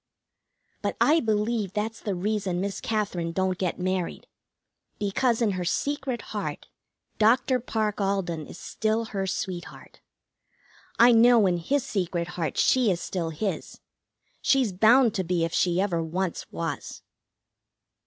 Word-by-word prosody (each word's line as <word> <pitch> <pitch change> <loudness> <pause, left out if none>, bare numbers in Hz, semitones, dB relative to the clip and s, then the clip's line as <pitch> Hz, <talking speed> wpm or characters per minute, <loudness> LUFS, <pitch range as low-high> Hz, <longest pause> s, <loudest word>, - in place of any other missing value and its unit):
But - - -2
I 315 +3 +5
believe 215 - 0
that's 220 +2 -3
the 205 -4 -3
reason 195 -1 -1
Miss 195 +1 -3
Katherine 195 -6 -2
don't 185 0 0
get 180 -3 -1
married. 185 -1 -2 0.7
Because 230 +4 +1
in 215 - +2
her 185 -1 -3
secret 270 - -2
heart - - -4 0.5
Dr. 245 +4 +4
Parke 215 -3 -2
Alden 190 -6 -1
is - - -10
still 220 +3 -1
her 195 -3 -3
sweetheart. 180 -2 -5 1.0
I 240 +1 +7
know 235 -1 +6
in 180 -2 +2
his 270 +11 0
secret 180 -8 -2
heart 170 -2 -3
she 255 -4 +4
is 180 -3 0
still 175 -3 -3
his. 175 +6 -4 0.6
She's 260 -7 +2
bound 225 +4 +5
to 190 - -1
be 175 -1 0
if 165 - -5
she 175 0 +2
ever 185 -4 +1
once 175 +2 -3
was. 165 -3 -5
200 Hz, 140 wpm, -26 LUFS, 180-225 Hz, 1.0 s, I